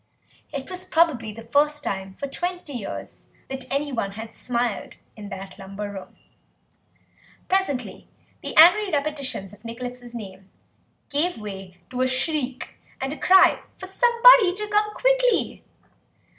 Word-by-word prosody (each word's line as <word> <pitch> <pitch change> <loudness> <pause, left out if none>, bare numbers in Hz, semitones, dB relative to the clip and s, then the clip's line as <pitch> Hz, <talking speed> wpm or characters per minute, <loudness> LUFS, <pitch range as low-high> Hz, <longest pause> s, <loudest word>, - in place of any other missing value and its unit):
It 275 -2 -5
was 365 0 -5
probably 320 -11 +2
the 225 +2 -10
first 290 +5 +1
time 190 -3 -4
for - - -5
twenty 350 +2 -4
years 230 -6 -7 0.2
that 265 -1 -6
anyone 270 -8 -1
had 220 +2 -8
smiled 240 -3 -3 0.2
in 205 -2 -9
that 195 0 -8
lumber 195 +1 -6
room. 195 -2 -10 1.3
Presently 370 -10 -1 0.3
the - - -5
angry 360 +6 +8
repetitions 280 -9 -2
of 210 - -17
Nicholas' 245 +1 -7
name 195 -3 -9 0.6
gave 325 +5 +1
way 195 -4 -8
to 255 0 -2
a 255 - +3
shriek, 260 0 -2 0.2
and 270 +2 -2
a - - -8
cry 375 0 +6 0.2
for - - -7
somebody 470 -1 +6
to 420 +1 -3
come 420 0 +2
quickly. - - +2
265 Hz, 135 wpm, -24 LUFS, 215-355 Hz, 1.3 s, angry